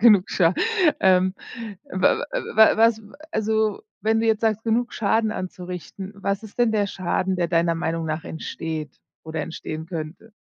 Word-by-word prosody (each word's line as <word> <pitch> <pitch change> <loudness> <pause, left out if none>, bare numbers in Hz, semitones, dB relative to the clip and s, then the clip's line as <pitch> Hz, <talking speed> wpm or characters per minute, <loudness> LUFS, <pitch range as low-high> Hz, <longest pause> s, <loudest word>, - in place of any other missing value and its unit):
Genug 210 -5 +6
Scha 175 -1 +3 0.5
ähm, 185 0 +4 0.6
wa 185 +8 +2
a - - -1 0.2
wa 220 -1 +7
was 225 0 +4
a - - -18 0.3
also, 220 - 0 0.2
wenn 220 +1 +2
du 225 - +1
jetzt 220 -1 +2
sagst, 220 -1 +1
genug 235 +2 +1
Schaden 220 +1 +1
anzurichten, 185 +1 -6
was 200 +1 -2
ist 220 +2 -12
denn 235 -2 +3
der 205 -2 +2
Schaden, 185 0 -1
der 170 -2 0
deiner 170 0 +2
Meinung 165 0 -2
nach 155 +1 -3
entsteht, 160 -2 -5 0.3
oder 160 0 -4
entstehen 160 -1 -6
könnte? 165 +6 -7
190 Hz, 165 wpm, -24 LUFS, 170-220 Hz, 0.6 s, wa